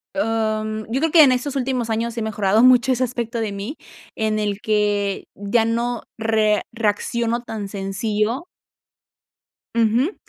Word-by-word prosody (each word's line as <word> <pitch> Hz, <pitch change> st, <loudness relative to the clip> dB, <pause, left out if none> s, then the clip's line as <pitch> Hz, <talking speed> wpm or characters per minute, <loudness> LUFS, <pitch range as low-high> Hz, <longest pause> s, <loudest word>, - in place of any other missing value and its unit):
om, 215 Hz, -4 st, -1 dB
yo 260 Hz, -, +1 dB
creo 325 Hz, -1 st, +1 dB
que 320 Hz, -3 st, +8 dB
en 265 Hz, -, +6 dB
estos 275 Hz, +3 st, -2 dB
últimos 250 Hz, -3 st, -1 dB
años 230 Hz, +1 st, -2 dB
he 230 Hz, -, -1 dB
mejorado 215 Hz, 0 st, +2 dB
mucho 255 Hz, 0 st, +6 dB
ese 255 Hz, -, 0 dB
aspecto 235 Hz, -1 st, -4 dB
de 215 Hz, -2 st, -2 dB
mí, 200 Hz, +9 st, -5 dB, 0.4 s
en 215 Hz, -1 st, 0 dB
el 205 Hz, -1 st, -2 dB
que 205 Hz, -2 st, 0 dB
ya 205 Hz, +3 st, +1 dB
no 235 Hz, +1 st, -1 dB, 0.2 s
re 215 Hz, -2 st, +2 dB
reacciono 230 Hz, +2 st, -1 dB
tan 220 Hz, -4 st, -6 dB
sencillo 210 Hz, -, -2 dB, 1.3 s
ujú, 235 Hz, -, +2 dB
225 Hz, 145 wpm, -21 LUFS, 210-240 Hz, 1.3 s, que